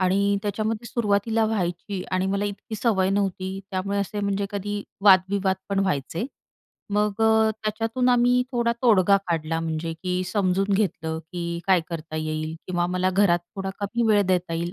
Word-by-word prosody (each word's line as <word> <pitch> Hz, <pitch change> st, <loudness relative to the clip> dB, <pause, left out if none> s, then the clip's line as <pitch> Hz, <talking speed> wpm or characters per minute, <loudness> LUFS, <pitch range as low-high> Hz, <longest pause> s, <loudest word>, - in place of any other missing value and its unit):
आणि 200 Hz, +2 st, +2 dB
त्याच्यामध्ये 215 Hz, +2 st, -2 dB
सुरुवातीला 220 Hz, -1 st, +1 dB
व्हायची 185 Hz, -2 st, -2 dB
आणि 185 Hz, 0 st, +1 dB
मला 200 Hz, +1 st, 0 dB
इतकी 205 Hz, +2 st, -5 dB
सवय 195 Hz, -4 st, +2 dB
नव्हती. 195 Hz, -1 st, -1 dB
त्यामुळे 200 Hz, +1 st, -1 dB
असे 200 Hz, +1 st, -2 dB
म्हणजे 200 Hz, 0 st, -1 dB
कधी 205 Hz, 0 st, -3 dB, 0.2 s
वाद-विवाद 190 Hz, 0 st, +4 dB
पण 200 Hz, -1 st, 0 dB
व्हायचे. 170 Hz, -, -1 dB, 0.7 s
मग 210 Hz, 0 st, 0 dB
अ, 220 Hz, 0 st, +4 dB
त्याच्यातून 225 Hz, +4 st, 0 dB
आम्ही 245 Hz, 0 st, +4 dB
थोडा 235 Hz, -1 st, +1 dB
तोडगा 200 Hz, -5 st, +5 dB
काढला. 165 Hz, 0 st, -1 dB
म्हणजे 165 Hz, 0 st, -3 dB
की 180 Hz, 0 st, -1 dB
समजून 195 Hz, 0 st, +1 dB
घेतलं, 160 Hz, -5 st, -1 dB
की 170 Hz, -1 st, -3 dB
काय 190 Hz, -2 st, +5 dB
करता 160 Hz, -2 st, -6 dB
येईल 155 Hz, 0 st, -3 dB
किंवा 175 Hz, -1 st, 0 dB
मला 185 Hz, +1 st, 0 dB
घरात 185 Hz, -2 st, +3 dB, 0.2 s
थोडा 195 Hz, 0 st, -3 dB
कमी 220 Hz, +4 st, -1 dB
वेळ 205 Hz, -1 st, +5 dB
देता 180 Hz, -2 st, 0 dB
येईल, 170 Hz, +1 st, -2 dB
195 Hz, 160 wpm, -24 LUFS, 180-210 Hz, 0.7 s, तोडगा